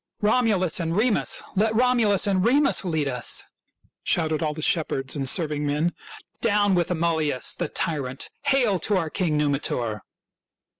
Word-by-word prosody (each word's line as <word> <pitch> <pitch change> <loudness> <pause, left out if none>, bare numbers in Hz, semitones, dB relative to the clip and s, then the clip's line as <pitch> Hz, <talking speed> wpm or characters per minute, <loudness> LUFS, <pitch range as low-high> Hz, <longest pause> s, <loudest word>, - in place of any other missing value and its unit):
"Romulus 210 -6 +2
and 165 +1 -2
Remus! 225 0 +1
Let 215 +3 +1
Romulus 230 -5 +2
and 190 -2 +1
Remus 275 +3 +3
lead 160 -5 -1
us! 125 -3 -1 0.3
" - - -51 0.3
shouted 160 -2 0
all 150 -2 -1
the 155 - -6
shepherds 135 -6 0
and 135 -2 0
serving 150 -2 0
men. 150 +4 0 0.2
" - - -21
Down 205 -3 +3
with 175 -2 +1
Amulius 160 -5 0
the - - -3
tyrant! 140 -6 -3
Hail 250 -9 +2
to 205 +4 0
our 165 -4 -2
King 165 -6 0
Numitor!" 135 -7 -1
170 Hz, 155 wpm, -24 LUFS, 150-210 Hz, 0.3 s, Remus